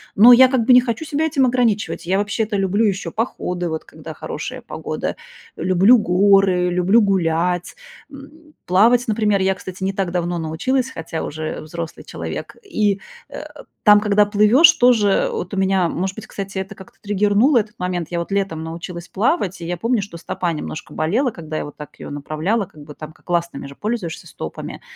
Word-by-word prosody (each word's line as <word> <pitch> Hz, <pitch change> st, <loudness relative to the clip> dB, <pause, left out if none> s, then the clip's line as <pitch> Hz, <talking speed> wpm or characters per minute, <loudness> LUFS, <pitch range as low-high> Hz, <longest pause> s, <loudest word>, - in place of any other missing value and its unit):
Но 235 Hz, +5 st, +9 dB
я 260 Hz, +2 st, +8 dB
как 250 Hz, -4 st, +1 dB
бы 255 Hz, -, +6 dB
не 250 Hz, -, +8 dB
хочу 240 Hz, +5 st, -3 dB
себя 300 Hz, +2 st, -1 dB
этим 280 Hz, -4 st, +2 dB
ограничивать. 235 Hz, -8 st, 0 dB
Я 190 Hz, +2 st, +1 dB
вообще-то 205 Hz, +1 st, -1 dB
люблю 195 Hz, +3 st, +1 dB
ещё 200 Hz, -1 st, -1 dB
походы, 180 Hz, -6 st, -3 dB
вот 160 Hz, 0 st, -4 dB
когда -, -, -10 dB
хорошая -, -, -6 dB
погода, -, -, -5 dB, 0.4 s
люблю 185 Hz, +7 st, +4 dB
горы, 190 Hz, -2 st, +3 dB
люблю 180 Hz, +6 st, +3 dB
гулять, 180 Hz, -3 st, 0 dB, 0.4 s
м. 300 Hz, +3 st, -14 dB
Плавать, 230 Hz, +7 st, +4 dB
например, 210 Hz, -2 st, +1 dB
я, 190 Hz, 0 st, +2 dB
кстати, 185 Hz, +1 st, -8 dB
не 195 Hz, +1 st, 0 dB
так 190 Hz, -2 st, -2 dB
давно 175 Hz, 0 st, -1 dB
научилась, 245 Hz, +12 st, -1 dB
хотя 165 Hz, -7 st, -5 dB
уже 155 Hz, +1 st, -5 dB
взрослый 165 Hz, +1 st, -7 dB
человек. -, -, -6 dB
И, 210 Hz, -, 0 dB, 0.3 s
э, -, -, -8 dB, 0.4 s
там, 210 Hz, -1 st, +7 dB
когда 210 Hz, 0 st, +3 dB
плывёшь, 215 Hz, +11 st, +6 dB
тоже 245 Hz, -, +3 dB
вот 450 Hz, -, -5 dB
у -, -, -3 dB
меня, 190 Hz, -2 st, +2 dB
может 190 Hz, +3 st, -3 dB
быть, 220 Hz, -, -9 dB
кстати, 195 Hz, -1 st, -6 dB
это 190 Hz, +2 st, -5 dB
как-то 190 Hz, -, -15 dB
триггернуло 210 Hz, +6 st, +2 dB
этот 210 Hz, 0 st, -5 dB
момент. 180 Hz, -3 st, -3 dB
Я 170 Hz, -, -1 dB
вот 170 Hz, +3 st, -5 dB
летом 195 Hz, -5 st, -1 dB
научилась 170 Hz, +2 st, -7 dB
плавать, 195 Hz, -, -1 dB
и 170 Hz, -, -5 dB
я 175 Hz, 0 st, -3 dB
помню, 230 Hz, +3 st, 0 dB
что 195 Hz, -4 st, -8 dB
стопа 170 Hz, +1 st, -3 dB
немножко 155 Hz, 0 st, -6 dB
болела, 220 Hz, -, 0 dB
когда 155 Hz, -4 st, -6 dB
я -, -, -2 dB
вот 145 Hz, -, -11 dB
так 150 Hz, -, -11 dB
её -, -, -8 dB
направляла. 155 Hz, +9 st, -2 dB
Как 150 Hz, -4 st, -15 dB
бы, 150 Hz, 0 st, -11 dB
там 155 Hz, 0 st, -9 dB
как -, -, -26 dB
ластами 170 Hz, -5 st, -1 dB
же 140 Hz, -, -12 dB
пользуешься 210 Hz, -5 st, -4 dB
стопами. -, -, -7 dB
195 Hz, 190 wpm, -20 LUFS, 175-225 Hz, 0.4 s, Но